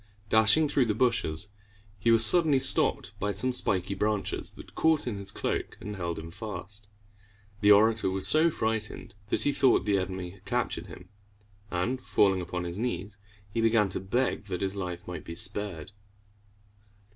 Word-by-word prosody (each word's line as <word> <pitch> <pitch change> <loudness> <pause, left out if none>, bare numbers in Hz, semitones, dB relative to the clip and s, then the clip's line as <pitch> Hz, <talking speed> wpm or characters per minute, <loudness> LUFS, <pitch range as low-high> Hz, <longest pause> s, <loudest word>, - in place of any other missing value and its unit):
Dashing 110 +9 +5
through 140 -3 +2
the 105 - 0
bushes, 105 -7 0 0.5
he 115 - +1
was 115 -1 +6
suddenly 160 0 +5
stopped 130 - +1
by 105 - -1
some 105 +6 -1
spiky 95 -5 +1
branches 105 +1 -2
that - - -13
caught 160 -2 +2
in 120 -4 -3
his 100 -1 -5
cloak - - -3
and 105 +1 -7
held 85 -3 -4
him 80 +1 -8
fast. 100 0 -7 0.7
The 105 - +3
orator 110 0 +5
was 95 0 +1
so 160 +2 +5
frightened 110 -8 -3 0.2
that - - +2
he 145 - +2
thought 130 -7 +3
the 100 -2 +2
enemy 95 -1 -5
had 95 +1 -19
captured 120 +3 -2
him, - - -12 0.6
and, 120 +9 -2
falling 95 -6 +2
upon 90 +1 -4
his 85 +3 -5
knees, 105 -4 -4 0.3
he 115 - 0
began 115 -3 +3
to - - -3
beg 100 +3 -1
that 90 -3 -5
his 95 0 -1
life 90 -3 -5
might 90 - -6
be 85 - -8
spared. 95 -2 -5
105 Hz, 170 wpm, -28 LUFS, 95-115 Hz, 0.7 s, was